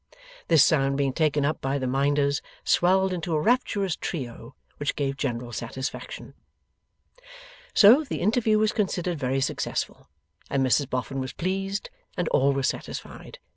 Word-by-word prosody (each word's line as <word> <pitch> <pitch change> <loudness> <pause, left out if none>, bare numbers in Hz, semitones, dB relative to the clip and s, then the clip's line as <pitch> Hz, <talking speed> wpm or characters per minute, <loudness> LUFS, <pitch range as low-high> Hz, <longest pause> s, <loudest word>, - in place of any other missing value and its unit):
This 160 -4 +6
sound 140 -5 +2
being 140 -2 0
taken 150 -2 +1
up 155 - -1
by 135 +1 -1
the 130 - -3
Minders, 140 +2 +1 0.2
swelled 190 +1 +3
into 170 -2 -2
a - - +2
rapturous 200 -3 +1
trio 125 -4 -6 0.2
which 145 - -2
gave 140 -2 -1
general 120 -3 -3
satisfaction. 125 +4 -6 1.4
So, 235 +8 +8
the 285 - -4
interview 220 +2 +2
was 215 0 +2
considered 180 -5 -1
very 135 0 0
successful, 140 - -3 0.4
and 135 -1 +1
Mrs 130 +2 +2
Boffin 130 +2 -3
was 130 -1 -4
pleased, 195 +2 -3 0.3
and 180 - 0
all 140 +1 +3
were 135 -1 -1
satisfied. - - -5
145 Hz, 145 wpm, -26 LUFS, 135-185 Hz, 1.4 s, So